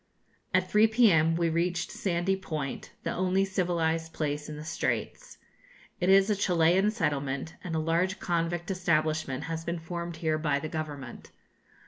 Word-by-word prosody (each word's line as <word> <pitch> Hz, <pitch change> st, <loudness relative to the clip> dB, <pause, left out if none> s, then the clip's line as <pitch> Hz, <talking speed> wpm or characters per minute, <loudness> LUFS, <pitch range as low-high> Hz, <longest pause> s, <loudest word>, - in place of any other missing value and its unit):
At -, -, +1 dB
3 215 Hz, +1 st, +6 dB
p.m. 190 Hz, -9 st, +4 dB
we 170 Hz, 0 st, +1 dB
reached 175 Hz, +2 st, 0 dB
Sandy 185 Hz, 0 st, 0 dB
Point, 155 Hz, -7 st, -5 dB
the -, -, -2 dB
only 185 Hz, +1 st, +1 dB
civilised 165 Hz, -4 st, -1 dB
place 150 Hz, -1 st, -3 dB
in 150 Hz, -, -6 dB
the 150 Hz, -, -7 dB
Straits. 485 Hz, -, -3 dB, 0.6 s
It 180 Hz, -, +1 dB
is 195 Hz, 0 st, +6 dB
a -, -, +3 dB
Chilian 180 Hz, +1 st, +3 dB
settlement, 145 Hz, -, -2 dB
and 170 Hz, -3 st, -3 dB
a -, -, +1 dB
large 170 Hz, +4 st, 0 dB
convict 175 Hz, +1 st, -1 dB
establishment 155 Hz, -6 st, 0 dB
has 165 Hz, 0 st, -4 dB
been 170 Hz, +1 st, -2 dB
formed 170 Hz, +1 st, -5 dB
here 160 Hz, -1 st, 0 dB
by 150 Hz, -3 st, +1 dB
the 155 Hz, +2 st, -4 dB
Government. 145 Hz, -6 st, -6 dB
165 Hz, 155 wpm, -29 LUFS, 155-185 Hz, 0.6 s, 3